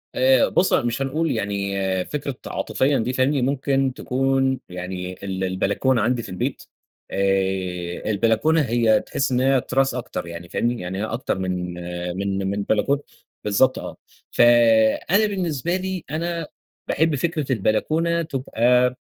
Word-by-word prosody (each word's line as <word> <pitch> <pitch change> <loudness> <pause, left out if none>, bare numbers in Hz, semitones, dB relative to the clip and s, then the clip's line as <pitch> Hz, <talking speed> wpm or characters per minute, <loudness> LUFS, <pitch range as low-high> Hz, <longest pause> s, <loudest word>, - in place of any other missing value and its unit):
آآ، 130 -1 +4
بُصّ، 185 - +2
مش 120 0 +1
هنقول 150 +3 0
يعني 100 -3 -2 0.3
فكرة 140 -2 -4
عاطفيًا 135 +1 0
دي، 125 +3 -1
فاهمني، 130 +2 +2
ممكن 135 0 +1
تكون 135 +1 0
يعني 90 0 -5
ال 95 -1 -3
البلكونة 100 +7 +1
عندي 120 +2 +1
في - - -9
البيت 90 - -3 0.5
آآ، 95 -1 -1
البلكونة 115 +10 +2
هي 115 -4 +3
تحس 135 - -2
إن 125 - +2
هي 135 -1 +3
تراس 135 0 0
أكتر 105 -8 -5
يعني، 85 +1 -8
فاهمني، 120 +1 -1
يعني 90 +1 -4
هي - - -1
أكتر 115 -3 -2
من 90 -1 -3 0.4
من 100 -1 -1
من 100 0 -2
بلكونة 140 +8 +1 0.4
بالضبط 115 +6 +2
آه، - - -7 0.3
ف - - +1 0.7
أنا 210 +3 +5
بالنسبة 175 -4 -1
لي 190 -1 -3
أنا 165 0 -2 0.4
باحب 160 0 +2
فكرة 155 -2 -2
البلكونة 160 - +1
تبقى 125 -4 +1
125 Hz, 140 wpm, -22 LUFS, 100-140 Hz, 0.7 s, أنا